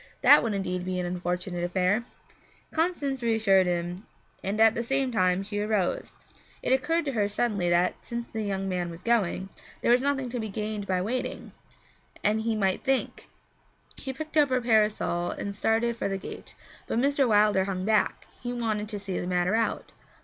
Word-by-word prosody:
That -, -, +8 dB
would 225 Hz, -3 st, -1 dB
indeed 180 Hz, -2 st, -2 dB
be 185 Hz, 0 st, -2 dB
an 180 Hz, -, -2 dB
unfortunate 180 Hz, 0 st, -3 dB
affair! 185 Hz, +6 st, +1 dB, 0.7 s
Constance 310 Hz, -6 st, -1 dB
reassured 220 Hz, -5 st, +3 dB
him, 175 Hz, +2 st, -3 dB, 0.4 s
and 200 Hz, +3 st, -2 dB
at 225 Hz, 0 st, +6 dB
the 235 Hz, -, -2 dB
same 270 Hz, +2 st, +1 dB
time 185 Hz, -3 st, +2 dB
she 205 Hz, +1 st, -4 dB
arose. 210 Hz, -3 st, -1 dB, 0.5 s
It -, -, +2 dB
occurred 330 Hz, +5 st, +1 dB
to 280 Hz, -, -1 dB
her 210 Hz, -5 st, 0 dB
suddenly 205 Hz, -4 st, 0 dB
that, 175 Hz, +1 st, +3 dB
since 235 Hz, 0 st, -4 dB
the 220 Hz, -, -4 dB
young 195 Hz, -2 st, -2 dB
man 180 Hz, -2 st, -2 dB
was 170 Hz, +1 st, -10 dB
going, 195 Hz, -5 st, +1 dB, 0.3 s
there -, -, +4 dB
was 245 Hz, +1 st, +5 dB
nothing 275 Hz, -2 st, 0 dB
to 245 Hz, 0 st, -3 dB
be 220 Hz, -1 st, -3 dB
gained 210 Hz, 0 st, -4 dB
by 185 Hz, -1 st, 0 dB
waiting, 245 Hz, +5 st, -3 dB, 0.7 s
and 215 Hz, +1 st, +2 dB
he 225 Hz, 0 st, 0 dB
might 195 Hz, -3 st, 0 dB
think 270 Hz, -1 st, -1 dB, 0.7 s
She 265 Hz, -, -4 dB
picked 310 Hz, +3 st, -5 dB
up 290 Hz, -2 st, +5 dB
her 255 Hz, 0 st, +2 dB
parasol 215 Hz, -7 st, +1 dB
and 200 Hz, 0 st, -4 dB
started 225 Hz, +3 st, +1 dB
for 230 Hz, -, -2 dB
the 195 Hz, 0 st, -2 dB
gate, -, -, -9 dB, 0.3 s
but -, -, -1 dB
Mr. 275 Hz, +1 st, +3 dB
Wilder 210 Hz, -3 st, +4 dB
hung 190 Hz, -1 st, -3 dB
back; 215 Hz, -1 st, +1 dB, 0.2 s
he 245 Hz, 0 st, -3 dB
wanted 215 Hz, -3 st, -2 dB
to 210 Hz, -, -3 dB
see 195 Hz, -2 st, -3 dB
the 175 Hz, -, -4 dB
matter 180 Hz, +1 st, +1 dB
out. 225 Hz, 0 st, -1 dB
210 Hz, 185 wpm, -27 LUFS, 185-235 Hz, 0.7 s, That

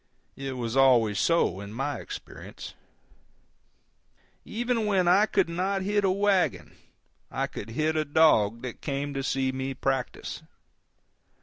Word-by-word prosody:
It 135 Hz, -1 st, -5 dB
was 120 Hz, -2 st, -4 dB
always 120 Hz, -6 st, +4 dB
so 165 Hz, -, +2 dB
in 100 Hz, +1 st, -8 dB
my 135 Hz, +5 st, -3 dB
experience. 410 Hz, -, -9 dB, 1.7 s
Even 235 Hz, -1 st, -1 dB
when 190 Hz, -4 st, +2 dB
I 195 Hz, +5 st, +5 dB
could -, -, +2 dB
not 190 Hz, +3 st, -1 dB
hit 205 Hz, +1 st, +1 dB
a 195 Hz, -, +3 dB
wagon 185 Hz, -, +1 dB, 0.5 s
I -, -, -1 dB
could 105 Hz, -, -8 dB
hit 155 Hz, +7 st, 0 dB
a 155 Hz, -, +2 dB
dog 125 Hz, -8 st, +3 dB
that 125 Hz, -3 st, -7 dB
came 140 Hz, 0 st, -3 dB
to 135 Hz, -, -2 dB
see 135 Hz, 0 st, 0 dB
me 130 Hz, 0 st, -4 dB
practice. 130 Hz, -1 st, -3 dB
140 Hz, 135 wpm, -27 LUFS, 125-190 Hz, 1.7 s, I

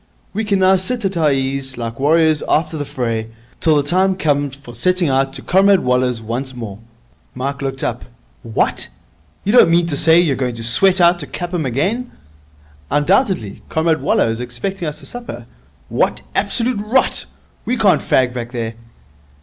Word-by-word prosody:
We 220 Hz, +2 st, -2 dB
can 200 Hz, -1 st, +1 dB
now 190 Hz, 0 st, +4 dB
sit 230 Hz, +4 st, -2 dB
at 195 Hz, -1 st, -1 dB
our 155 Hz, -3 st, +3 dB
ease, 135 Hz, -1 st, -2 dB
like 115 Hz, 0 st, -5 dB
warriors 155 Hz, +1 st, +3 dB
after 160 Hz, +1 st, +1 dB
the 145 Hz, -2 st, -3 dB
fray, 115 Hz, -5 st, -3 dB, 0.3 s
till 160 Hz, -2 st, +3 dB
the 145 Hz, -, +2 dB
time 185 Hz, +6 st, +2 dB
comes 145 Hz, -5 st, 0 dB
for 135 Hz, -4 st, -13 dB
setting 180 Hz, +7 st, +1 dB
out 135 Hz, 0 st, +1 dB
to -, -, -8 dB
Comrade 195 Hz, +1 st, +4 dB
Waller's 125 Hz, -1 st, +1 dB
once 125 Hz, +4 st, -4 dB
more.' 105 Hz, -5 st, -7 dB, 0.6 s
Mike 140 Hz, +2 st, -3 dB
looked 135 Hz, -1 st, -3 dB
up. -, -, -3 dB, 0.4 s
'What! 115 Hz, -, -1 dB, 0.6 s
You 205 Hz, -, 0 dB
don't 245 Hz, -, +7 dB
mean 170 Hz, +1 st, +3 dB
to 165 Hz, -4 st, -2 dB
say 160 Hz, +3 st, +5 dB
you're 160 Hz, -6 st, +2 dB
going 125 Hz, -2 st, -2 dB
to 115 Hz, -, -6 dB
sweat 185 Hz, +12 st, +4 dB
out 175 Hz, 0 st, +5 dB
to 145 Hz, -, -6 dB
Clapham 175 Hz, +2 st, -3 dB
again?' 195 Hz, -, -1 dB, 0.8 s
'Undoubtedly. 180 Hz, -, +1 dB
Comrade 160 Hz, 0 st, +1 dB
Waller -, -, +2 dB
is 115 Hz, 0 st, -2 dB
expecting 125 Hz, +10 st, -4 dB
us 150 Hz, -, -5 dB
to -, -, -11 dB
supper.' 230 Hz, -, -7 dB, 0.4 s
'What -, -, 0 dB
absolute 230 Hz, +3 st, 0 dB
rot! 240 Hz, +5 st, +1 dB, 0.4 s
We 250 Hz, -, 0 dB
can't 205 Hz, -5 st, +3 dB
fag 125 Hz, -2 st, +2 dB
back 120 Hz, 0 st, -6 dB
there.' 115 Hz, -2 st, -3 dB
150 Hz, 175 wpm, -18 LUFS, 125-185 Hz, 0.8 s, don't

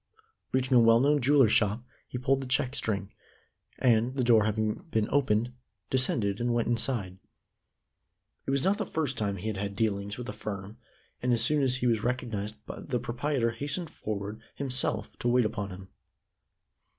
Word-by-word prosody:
Reaching 130 Hz, 0 st, +1 dB
a -, -, +8 dB
well 115 Hz, 0 st, +6 dB
known 145 Hz, +2 st, +3 dB
jeweler's 135 Hz, -3 st, +5 dB
shop, 105 Hz, +2 st, +2 dB, 0.2 s
he -, -, -5 dB
pulled 135 Hz, +2 st, +1 dB
the 135 Hz, -, -5 dB
check 130 Hz, 0 st, +1 dB
string, 100 Hz, -2 st, -2 dB, 0.6 s
and, 120 Hz, +1 st, +2 dB
the 130 Hz, -, +1 dB
door 115 Hz, -3 st, +5 dB
having 110 Hz, -, -1 dB
been 110 Hz, -7 st, +1 dB
opened, 120 Hz, -3 st, +2 dB, 0.4 s
descended, 115 Hz, -6 st, +1 dB
and 120 Hz, 0 st, +1 dB
went 120 Hz, -, +1 dB
inside. 115 Hz, -6 st, -1 dB, 1.3 s
It -, -, -1 dB
was 135 Hz, 0 st, +1 dB
not 200 Hz, +3 st, +2 dB
the -, -, -1 dB
first 150 Hz, -5 st, -1 dB
time 105 Hz, -3 st, -1 dB
he 95 Hz, -, -8 dB
had 110 Hz, -3 st, -2 dB
had 100 Hz, 0 st, -3 dB
dealings 100 Hz, -1 st, -1 dB
with 125 Hz, -, -6 dB
the 105 Hz, -, -5 dB
firm, 105 Hz, +1 st, -7 dB, 0.4 s
and 125 Hz, -, +1 dB
as 115 Hz, -1 st, +3 dB
soon 150 Hz, +4 st, +2 dB
as 130 Hz, -2 st, +2 dB
he 130 Hz, -, -2 dB
was 115 Hz, -3 st, +2 dB
recognized 115 Hz, -4 st, -2 dB
the 125 Hz, -, -3 dB
proprietor 120 Hz, +1 st, -1 dB
hastened 145 Hz, +8 st, -3 dB
forward 105 Hz, +1 st, -5 dB
himself 125 Hz, -6 st, -1 dB
to -, -, -1 dB
wait 125 Hz, -1 st, +4 dB
upon 105 Hz, -2 st, -3 dB
him. 95 Hz, 0 st, -10 dB
120 Hz, 175 wpm, -29 LUFS, 105-130 Hz, 1.3 s, a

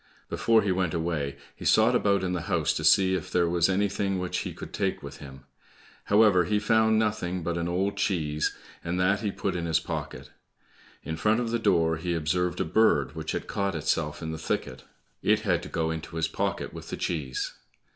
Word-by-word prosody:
Before 115 Hz, -1 st, +3 dB
he 100 Hz, -, +1 dB
went 90 Hz, -2 st, 0 dB
away, 80 Hz, -4 st, -2 dB, 0.2 s
he -, -, -11 dB
sought 110 Hz, +3 st, +4 dB
about 100 Hz, -4 st, +2 dB
in 90 Hz, -1 st, -1 dB
the 90 Hz, -, -2 dB
house -, -, +2 dB
to 75 Hz, -, -3 dB
see 95 Hz, +4 st, +5 dB
if 95 Hz, -, -2 dB
there 85 Hz, -1 st, +2 dB
was 85 Hz, +1 st, +2 dB
anything 100 Hz, 0 st, 0 dB
which 90 Hz, -1 st, -2 dB
he -, -, -4 dB
could -, -, -9 dB
take -, -, -1 dB
with -, -, -8 dB
him; 65 Hz, -1 st, -11 dB, 0.6 s
however, 105 Hz, -4 st, +5 dB
he 105 Hz, -, +1 dB
found 110 Hz, +1 st, +3 dB
nothing 105 Hz, -5 st, -1 dB
but 85 Hz, 0 st, -2 dB
an 85 Hz, 0 st, -2 dB
old 95 Hz, +3 st, -1 dB
cheese, 75 Hz, -6 st, 0 dB, 0.3 s
and 90 Hz, +2 st, -2 dB
that 100 Hz, +2 st, +3 dB
he 105 Hz, -, -1 dB
put 95 Hz, -1 st, -3 dB
in 85 Hz, -1 st, -2 dB
his 80 Hz, -1 st, +2 dB
pocket. -, -, -6 dB, 0.7 s
In 80 Hz, 0 st, -4 dB
front 110 Hz, +6 st, +2 dB
of 120 Hz, -2 st, -2 dB
the 120 Hz, -, 0 dB
door 80 Hz, -6 st, +2 dB
he 85 Hz, +1 st, -2 dB
observed 85 Hz, +2 st, 0 dB
a -, -, +1 dB
bird 100 Hz, -4 st, +3 dB
which 80 Hz, -1 st, -4 dB
had -, -, -3 dB
caught 100 Hz, -2 st, -2 dB
itself 75 Hz, 0 st, -1 dB
in 80 Hz, -, -3 dB
the 80 Hz, -, -5 dB
thicket. -, -, -3 dB, 0.4 s
It 110 Hz, 0 st, +3 dB
had 90 Hz, -5 st, +1 dB
to -, -, -8 dB
go 80 Hz, -2 st, -1 dB
into 80 Hz, 0 st, -6 dB
his 80 Hz, -1 st, +1 dB
pocket 80 Hz, -, -3 dB
with -, -, -9 dB
the -, -, -4 dB
cheese. 70 Hz, -7 st, -3 dB
90 Hz, 210 wpm, -27 LUFS, 80-100 Hz, 0.7 s, see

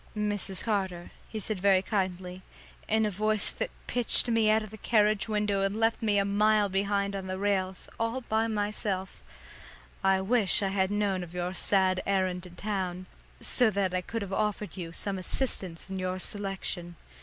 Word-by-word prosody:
"Mrs. 205 Hz, -2 st, 0 dB
Carter," 190 Hz, -5 st, -2 dB, 0.2 s
he 220 Hz, -, -4 dB
said 210 Hz, -1 st, -2 dB
very 190 Hz, 0 st, +4 dB
kindly, 185 Hz, -3 st, -2 dB, 0.5 s
in 220 Hz, 0 st, +2 dB
a 210 Hz, -, 0 dB
voice 215 Hz, +2 st, 0 dB
that -, -, -3 dB, 0.2 s
pitched 245 Hz, 0 st, +4 dB
me 225 Hz, -2 st, +3 dB
out 215 Hz, 0 st, +4 dB
of 215 Hz, -, -9 dB
the 220 Hz, -, -9 dB
carriage 215 Hz, -1 st, +3 dB
window 210 Hz, -2 st, +1 dB
and 195 Hz, +2 st, 0 dB
left 225 Hz, 0 st, +2 dB
me 210 Hz, -2 st, +2 dB
a 200 Hz, -, +3 dB
mile 210 Hz, +1 st, +3 dB
behind 200 Hz, +1 st, 0 dB
on 190 Hz, -1 st, -4 dB
the 185 Hz, 0 st, -3 dB
rails, 190 Hz, -2 st, -1 dB
all 230 Hz, +3 st, -1 dB
by 225 Hz, -1 st, 0 dB
myself, 205 Hz, -3 st, -2 dB, 0.8 s
"I 195 Hz, 0 st, +4 dB
wish 210 Hz, 0 st, +3 dB
I 195 Hz, -, +1 dB
had 190 Hz, -1 st, +1 dB
known 205 Hz, -2 st, 0 dB
of 175 Hz, 0 st, -8 dB
your 180 Hz, +1 st, -2 dB
sad 190 Hz, -1 st, +2 dB
errand 185 Hz, -2 st, +1 dB
to 180 Hz, -, -9 dB
town, 185 Hz, -1 st, -3 dB, 0.4 s
so 245 Hz, -3 st, +3 dB
that 195 Hz, -3 st, 0 dB
I 185 Hz, -, +1 dB
could 225 Hz, +3 st, -4 dB
have 195 Hz, -1 st, -6 dB
offered 210 Hz, 0 st, -1 dB
you 170 Hz, -3 st, -6 dB
some 195 Hz, +3 st, -3 dB
assistance 185 Hz, -4 st, -2 dB
in 190 Hz, 0 st, -4 dB
your 185 Hz, 0 st, -2 dB
selection. 190 Hz, -3 st, -3 dB
200 Hz, 180 wpm, -29 LUFS, 185-215 Hz, 0.8 s, very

